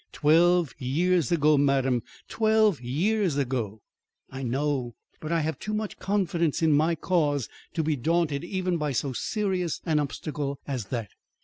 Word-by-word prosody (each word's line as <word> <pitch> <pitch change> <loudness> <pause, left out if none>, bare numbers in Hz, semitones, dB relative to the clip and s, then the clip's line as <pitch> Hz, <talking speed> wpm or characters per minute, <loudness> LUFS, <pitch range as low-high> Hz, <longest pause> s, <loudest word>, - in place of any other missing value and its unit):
"Twelve 165 -1 +4
years 170 +6 +1
ago, 150 -3 +4
madam; 135 -3 +2 0.3
twelve 220 - +2
years 170 - 0
ago." 120 -6 -2 0.5
"I 135 0 -6
know; 130 -1 -1 0.2
but 155 - -6
I 165 -1 +2
have 155 +1 -2
too 215 0 -3
much 215 -1 -4
confidence 175 -6 0
in 160 - +4
my 160 +3 +3
cause 145 - 0 0.3
to 160 - +1
be 155 0 +1
daunted 160 +2 0
even 180 -1 -1
by 150 -3 -1
so 130 +1 -1
serious 185 - -1
an 155 -3 +2
obstacle 145 0 -3
as 130 -6 -3
that. 115 0 -4
155 Hz, 150 wpm, -27 LUFS, 135-175 Hz, 0.5 s, Twelve